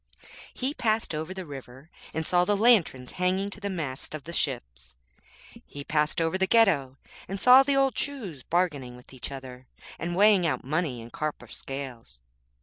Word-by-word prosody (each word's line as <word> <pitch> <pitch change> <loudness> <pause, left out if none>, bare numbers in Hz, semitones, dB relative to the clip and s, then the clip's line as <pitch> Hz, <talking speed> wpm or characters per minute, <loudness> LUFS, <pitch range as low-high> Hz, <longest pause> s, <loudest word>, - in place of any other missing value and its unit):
He 260 +3 -3
passed 220 - 0
over 155 +3 -4
the 190 -1 -6
river, 135 +1 -11 0.2
and 160 0 -3
saw 180 +1 +3
the 205 +2 +1
lanterns 195 - +3
hanging 190 +2 +1
to 200 - -9
the 200 0 -3
masts 155 -6 -5
of 150 - -7
the 170 - -8
ships. 60 - -3 0.7
He 145 - -9
passed 150 +2 0
over 165 +3 0
the 190 - +2
Ghetto, 160 - +3 0.3
and 195 +1 -4
saw 255 +4 +8
the 275 +1 +1
old 270 -2 +3
Jews 215 - -4
bargaining 145 -7 -1
with 125 +2 -16
each 130 +1 -7
other, 130 -2 -9 0.3
and 175 +1 -3
weighing 200 -2 +5
out 130 -5 -1
money 145 -3 -1
in 115 +1 -11
copper 155 -1 -4
scales. 130 - -7
160 Hz, 175 wpm, -27 LUFS, 130-195 Hz, 0.7 s, saw